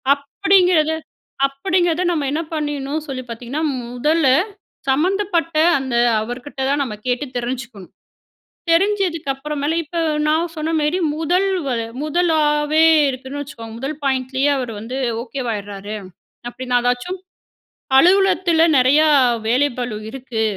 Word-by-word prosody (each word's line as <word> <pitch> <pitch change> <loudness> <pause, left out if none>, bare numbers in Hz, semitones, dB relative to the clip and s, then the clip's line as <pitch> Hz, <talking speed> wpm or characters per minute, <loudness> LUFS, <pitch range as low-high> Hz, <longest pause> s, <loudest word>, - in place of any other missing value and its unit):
அப்படிங்கிறத 340 +1 +2 0.5
அப்படிங்கிறத 345 +5 0
நம்ம 305 -4 -1
என்ன 310 - -1
பண்ணீடணும்னு 295 0 -3
சொல்லி 255 -1 -4
பார்த்தீங்கன்னா, 245 +6 -4 0.3
முதல்ல 305 +4 +2 0.6
சம்மந்தப்பட்ட 340 +2 0 0.2
அந்த 260 -2 -3 0.3
அவர்கிட்ட 245 +5 -7
தான் 285 +1 +1
நம்ம 230 -6 -5
கேட்டு 250 +3 0
தெரிஞ்சிக்கணும். 240 -5 -5 0.8
தெரிஞ்சதுக்கு 355 -4 +1
அப்பறமேல், 295 +2 -3
இப்ப 335 +2 -4 0.3
நான் 325 +2 +1
சொன்ன 315 +1 -2
மாரி 300 +5 0 0.2
முதல் 355 +5 +1 0.2
வ - - -1 0.3
முதலாவே 305 -1 +2 0.3
இருக்குன்னு 265 +2 -6
வச்சுக்கோங்க. 230 -6 -9
முதல் 275 +4 -4
பாயிண்ட்லயே 265 +1 0
அவரு 245 -4 -4
வந்து 240 +5 -6 0.2
ஓகேவாயிடுறாரு. 215 -5 -5 0.5
அப்படீன்னா, 250 0 -1
ஏதாச்சும் 250 +10 -1 0.8
அலுவலகத்தில 360 -1 +4
நெறைய 265 +4 +5 0.4
வேலை 255 +6 +3
பளு 240 -3 -3
இருக்கு. 250 -4 -4
290 Hz, 110 wpm, -20 LUFS, 255-330 Hz, 0.8 s, நெறைய